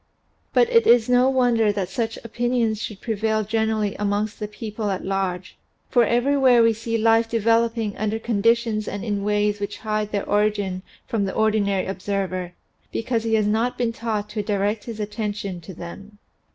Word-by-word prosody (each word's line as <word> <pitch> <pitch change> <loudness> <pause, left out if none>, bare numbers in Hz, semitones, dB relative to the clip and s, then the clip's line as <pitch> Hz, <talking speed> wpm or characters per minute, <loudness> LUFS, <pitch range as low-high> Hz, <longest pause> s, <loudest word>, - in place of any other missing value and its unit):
But 480 - +4
it 465 -2 +4
is 235 -2 +6
no 250 +1 +4
wonder 240 -5 +3
that 200 -3 -2
such 225 +4 -3
opinions 230 -1 0
should 210 -4 -6
prevail 220 -1 0
generally 220 -1 0
amongst 205 +1 -1
the 210 - -3
people 210 0 -5
at 190 -2 -3
large, 190 -1 -2 0.3
for 240 -3 +5
everywhere 245 0 +4
we 230 0 +4
see 230 +1 -2
life 225 +1 +3
developing 230 -1 +1
under 215 +1 -1
conditions 225 0 +1
and 205 +2 -4
in 205 -2 -2
ways 210 0 +1
which 205 0 -4
hide 215 -1 -1
their 200 -1 -2
origin 205 -3 0 0.2
from 220 -5 -1
the 190 - -4
ordinary 205 -3 +1
observer 185 -2 -3 0.4
because 230 0 -1
he 225 0 +2
has 215 -1 +2
not 225 +4 0
been 235 -2 0
taught 220 -3 -3
to 210 0 -2
direct 205 +1 -1
his 230 -2 -7
attention 205 -3 -4
to 175 +3 -10
them. 200 +5 -10
215 Hz, 170 wpm, -23 LUFS, 205-230 Hz, 0.4 s, is